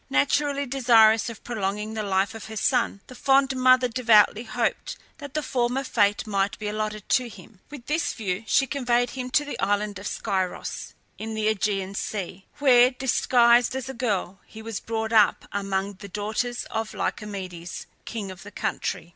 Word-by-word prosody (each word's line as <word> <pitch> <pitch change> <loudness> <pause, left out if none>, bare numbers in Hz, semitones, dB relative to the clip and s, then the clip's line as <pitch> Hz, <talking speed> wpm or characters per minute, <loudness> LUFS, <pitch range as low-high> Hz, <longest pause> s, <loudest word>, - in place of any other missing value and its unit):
Naturally 280 - +1
desirous 235 -4 +4
of 230 - -10
prolonging 210 -1 -3
the 220 - -3
life 195 +1 0
of 225 - -8
her 220 - -8
son, 235 -4 +1
the - - -12
fond 270 +1 +2
mother 255 0 +5
devoutly 230 -2 +4
hoped - - -2 0.2
that 285 -1 -9
the 305 - 0
former 250 +1 0
fate 205 -5 +1
might 200 -1 -1
be 215 - -5
allotted 215 0 -3
to 250 -2 +2
him. 215 -2 -15
With 285 -5 -10
this 310 +4 -1
view 200 -2 -3
she 270 - +3
conveyed 245 -2 0
him 255 -1 -5
to 295 +3 +2
the 290 - -6
island 205 0 0
of 200 - -6
Scyros, 190 -4 -3 0.2
in 220 0 -5
the 215 0 0
AEgean 200 -2 -1
Sea, 195 -2 -5
where, 250 -4 +6
disguised 245 -2 +3
as 265 0 -4
a - - -4
girl, 205 -6 -2
he 220 0 -11
was 225 -2 -4
brought 220 0 -3
up 210 -3 +4
among 195 0 -2
the 200 -1 -9
daughters 215 +5 -3
of 225 0 -3
Lycomedes, 185 -5 -5 0.2
king 210 -4 -5
of 185 - -11
the 205 - -10
country. 170 -4 -3
220 Hz, 175 wpm, -25 LUFS, 200-250 Hz, 0.2 s, where